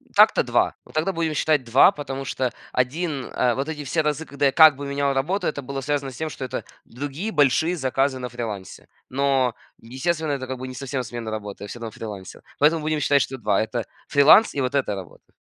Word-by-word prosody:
так-то - - +6
2. - - +1
Вот - - -17
тогда 160 +5 +1
будем 165 -2 -1
считать 150 -2 +2
2, 125 +9 +6
потому 135 -5 -6
что 130 -1 -1 0.2
1, 140 +2 -1
э, 125 -1 0
вот 135 +3 -3
эти 150 -2 -5
все 160 +4 +1
разы, 150 +1 -1
когда 140 -1 -1
я 135 - +4
как 155 0 +8
бы 140 +1 -7
менял 140 0 0
работу, 175 +8 -1
это 145 -2 -2
было 135 +1 -5
связано 140 -1 -2
с - - -12
тем, 160 0 -3
что 135 - -6
это - - -4 0.2
другие 145 - -5
большие 150 - +3
заказы 135 -2 0
на 125 -1 -5
фрилансе. 110 -5 -7 0.2
Но, 135 -2 +1 0.3
естественно, 155 +6 -2
это 130 -2 -4
как 130 0 -4
бы 130 - -5
не 130 - -8
совсем 135 -1 -3
смена 115 -1 -6
работы, 105 -2 -5
я - - -6
всё 120 - -8
равно 115 -1 -6
фрилансил. 100 -4 -8 0.2
Поэтому 155 +3 +4
будем 155 0 -1
считать, 140 -1 +3
что 135 0 -3
2- 105 -4 +1
это 115 +1 -2 0.2
фриланс, 150 +10 +6
и 140 - 0
вот 125 +2 -1
эта 130 -7 0
работа. 95 -3 -11
135 Hz, 220 wpm, -23 LUFS, 125-150 Hz, 0.3 s, как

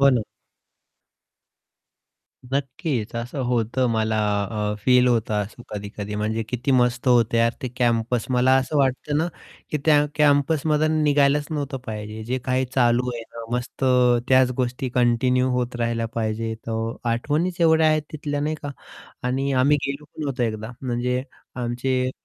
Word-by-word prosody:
हो 140 - +7
ना. 120 -3 +2 2.3
नक्कीच 135 - -2
असं 120 +4 -4
होतं 120 +1 +1
मला 110 0 0 0.6
अ, - - -3
फील 125 -1 +5
होतं 115 -3 +1
असं 110 +4 -12
कधी-कधी 105 0 -6
म्हणजे 110 +2 -1
"किती 125 +3 -2
मस्त 125 0 +2
होतं 115 -2 +4
यार 115 0 +3
ते 130 - -2
कॅम्पस." 120 -1 +1
मला 125 +1 +4
असं 135 +3 0
वाटतं 135 +2 +1
ना 160 - +1 0.4
की 150 - 0
त्या 150 -2 +5
कॅम्पसमधून 150 +1 +2
निघायलाच 145 0 +3
नव्हतं 145 -3 -3
पाहिजे. 110 0 -6
जे 130 +3 -2
काही 130 0 +1
चालू 125 0 +3
आहे 115 - -5
ना 115 0 -10
मस्त 125 +2 -4 0.4
त्याच 130 -1 +5
गोष्टी 125 0 -1
कंटिन्यू 125 +1 +2
होत 125 -1 -1
राहिल्या 115 -1 -1
पाहिजे. 110 0 -2
तर 115 0 -2 0.2
आठवणीच 155 +9 -1
एवढ्या 160 -1 +5
आहेत 155 -1 +2
तिथल्या 145 -1 -3
नाही 150 +2 -1
का 145 - -4 0.6
आणि 135 +2 0
आम्ही 135 +3 +4
गेलो 140 +2 -4
पण 150 +1 -8
होतो 135 -2 -2
एकदा 110 -1 -2
म्हणजे 125 0 -1 0.3
आमचे 130 +1 -1
125 Hz, 150 wpm, -23 LUFS, 115-140 Hz, 2.3 s, हो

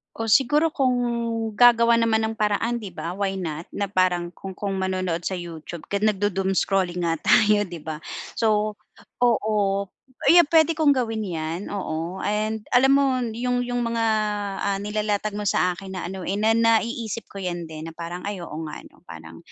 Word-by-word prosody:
Oh, 225 0 -3
siguro 295 +7 +4
kung 260 -4 +1 0.6
gagawa 235 -1 +6
naman 220 -1 +2
ng 220 0 -2
paraan 215 +3 0
di 200 -5 -8
ba 165 +1 -5
why 195 -1 -1
not, 165 -3 -5
na 200 -1 -2
parang 180 -2 +1
kung 190 +1 -9
kung 195 -1 -3
manonood 185 -2 -2
sa 190 - -2
YouTube 170 -1 -8 0.2
nagdu 205 -1 +1
doom 190 +1 -1
scrolling 185 -2 0
nga 165 -2 0
tayo 210 -2 +4
'di 175 -3 -8
ba? 155 -1 -5 0.3
So 215 -1 +1 0.5
oo, 225 -3 +2 0.7
ayan 345 -2 +7
pwede 325 0 +5
kong 310 -2 +2
gawin 225 -4 -1
yan, 170 -2 -3
oo. 175 -2 -4
And 215 +1 -1
alam 265 +2 +5
mo 270 -2 +2
yung 245 +2 -1
yung 245 -1 -2
mga 230 0 -1 0.6
ah, 200 -1 0
nilalatag 210 0 -2
mo 210 - -4
sa 180 -2 +1
akin 195 0 -8
na 185 - -4
ano 190 -2 -6
eh, 190 - -1
na 220 +1 +3
naiisip 230 -1 +1
ko 200 - -11
yan 175 -3 -4
din 155 0 -7
na 165 - -8
parang, 170 +2 -7
ay 200 -2 -4
oo 165 -2 -7
nga 150 - -7
ano - - -18
parang, 80 0 -11
205 Hz, 180 wpm, -24 LUFS, 180-230 Hz, 0.7 s, ayan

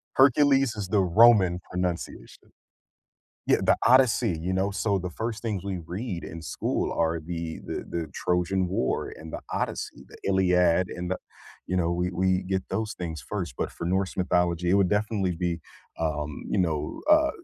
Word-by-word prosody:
Hercules 135 -2 +5
is 100 -3 -4
the 105 -1 +3
Roman 95 -1 +5
pronunciation 90 -1 -4 1.0
Yeah, - - +4
The - - +4
Odyssey, 120 -7 +4
you 90 +3 -2
know, 95 +2 +1
so, 100 0 0
the 90 0 -4
first 110 +3 -4
things 105 -5 -3
we 95 -2 -3
read 90 0 -5
in 80 +1 -8
school - - -2
are 80 0 0
the 85 0 -5
the - - -4
the 85 -2 -3
Trojan 90 +1 0
War 90 -8 -1
and 80 0 -10
The - - -5
Odyssey, - - -3
The - - -13
Iliad 90 -2 +3
and 90 0 -5
the 95 - -2 0.5
you 90 - -1
know, 85 -1 +1
we 90 +1 -1
we 95 +1 +1
get 95 0 -1
those 105 +2 -2
things 80 -6 -5
first, 60 - -3
but - - -2
for - - -7
Norse 95 +1 0
mythology, 90 -1 +1
it - - +4
would 100 -2 +3
definitely 105 -4 0
be, 85 -1 -2 0.4
um, 75 -2 -2
you 100 - +1
know, 80 -4 -1
uh, 310 0 +6
90 Hz, 175 wpm, -26 LUFS, 85-100 Hz, 1.0 s, uh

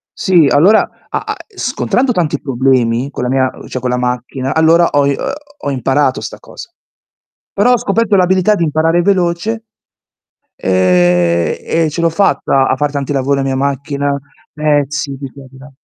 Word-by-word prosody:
sì, 180 -5 +3
allora, 170 +11 +4 0.2
a - - -2
a - - -3
e 415 - -25
scontrando 260 0 0
tanti 160 - -1
problemi 130 -1 0
con 135 - -5
la 125 - -1
mia, 130 0 +1 0.2
cioè 130 - -4
con 125 0 -3
la 125 - 0
macchina, 125 +1 -3
allora 165 +2 +4
ho 145 -1 +2
i 140 - +1
uhm, - - -3 0.3
ho 145 - 0
imparato 135 +1 0
'sta - - -7
cosa. - - -11 0.8
Però 245 +5 +3
ho - - +3
scoperto 225 -1 0
l'abilità 190 +2 +3
di 170 - -1
imparare 165 +2 +1
veloce 185 +3 0 1.0
ehm, 90 -2 +2 0.3
e - - +1
ce 160 - -4
l'ho 170 - +3
fatta 160 -6 +1
a - - +1
far 145 +2 -1
tanti 140 0 -3
lavori 140 0 0
la - - 0
mia 135 -1 -1
macchina, 140 +1 -2 0.3
pezzi 145 -2 -1
di 135 -1 -7
qua 135 +1 -13
e - - -14
di 130 - -16
là. 135 +2 -13
140 Hz, 180 wpm, -14 LUFS, 130-170 Hz, 1.0 s, allora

